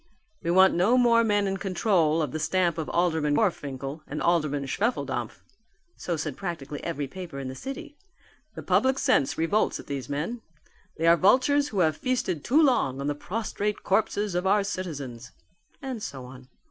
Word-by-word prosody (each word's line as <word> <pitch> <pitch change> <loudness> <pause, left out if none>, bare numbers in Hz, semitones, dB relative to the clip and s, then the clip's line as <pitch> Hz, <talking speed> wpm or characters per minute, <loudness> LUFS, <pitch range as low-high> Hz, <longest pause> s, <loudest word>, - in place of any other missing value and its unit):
"We 170 - -3
want 190 +2 +6
no 200 +9 +3
more 235 -2 +5
men 205 -2 +2
in 195 0 -1
control 180 -5 +1
of 145 - -3
the 155 - -3
stamp 175 -1 +1
of 155 - -4
Alderman 160 -4 +1
Gorfinkel 145 - -2
and 150 - -5
Alderman 150 -5 +1
Schwefeldampf," 135 - -2 0.5
so 170 -2 -3
said 155 -3 -4
practically 155 -6 -6
every 145 0 -3
paper 175 0 -8
in 135 -1 -5
the - - -6
city. 270 - -8 0.6
"The - - -7
public 265 +1 +2
sense 255 - +2
revolts 165 +7 +1
at - - -10
these 135 -3 -5
men. 165 +12 -3 0.6
They 165 - -1
are 170 0 +7
vultures 260 - +4
who 200 -8 -1
have 155 -2 +2
feasted 215 - -1
too 305 +6 +4
long 140 - +2
on 140 - -3
the 145 - 0
prostrate 210 +5 -3
corpses 205 0 0
of 180 +2 0
our 205 +1 +3
citizens." 145 - -6 0.5
And 260 -5 -4
so 135 -9 -6
on. 125 0 -12
175 Hz, 175 wpm, -26 LUFS, 145-210 Hz, 0.6 s, are